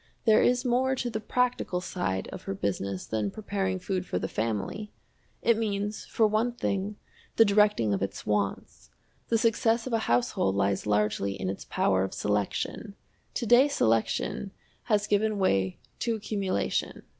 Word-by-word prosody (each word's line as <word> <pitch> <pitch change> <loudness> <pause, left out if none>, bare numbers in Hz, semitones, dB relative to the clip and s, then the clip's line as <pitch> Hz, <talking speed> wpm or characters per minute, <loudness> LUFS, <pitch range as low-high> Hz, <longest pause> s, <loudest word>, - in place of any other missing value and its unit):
There 220 -2 +6
is 250 +1 +2
more 255 +2 +2
to 245 -2 -3
the 220 - -2
practical 245 -4 0
side 180 - -2
of - - -8
her 95 - -3
business 100 -1 -2
than 110 -2 -1
preparing 195 - -2
food 185 0 -2
for 90 - -3
the 95 - -2
family! 110 - -3 0.5
It 230 -1 +4
means, 210 -1 -2
for 225 - +2
one 215 +3 +1
thing, 205 -3 -2 0.4
the 225 - +7
directing 205 - +3
of 100 - -1
its 100 - -4
wants. 105 -2 -2 0.4
The 230 - +2
success 230 0 +2
of 255 - -4
a 225 - +3
household 120 -5 +2
lies 100 0 0
largely 105 -1 +1
in 95 - -1
its 95 - -8
power 95 -1 +1
of 95 - -4
selection. 105 - -2 0.4
To 240 - -1
day 245 +5 +6
selection 115 - 0 0.4
has 210 -3 +2
given 210 +1 +1
way 95 - +1 0.2
to 230 -2 0
accumulation. 200 -3 -2
200 Hz, 160 wpm, -28 LUFS, -, 0.5 s, the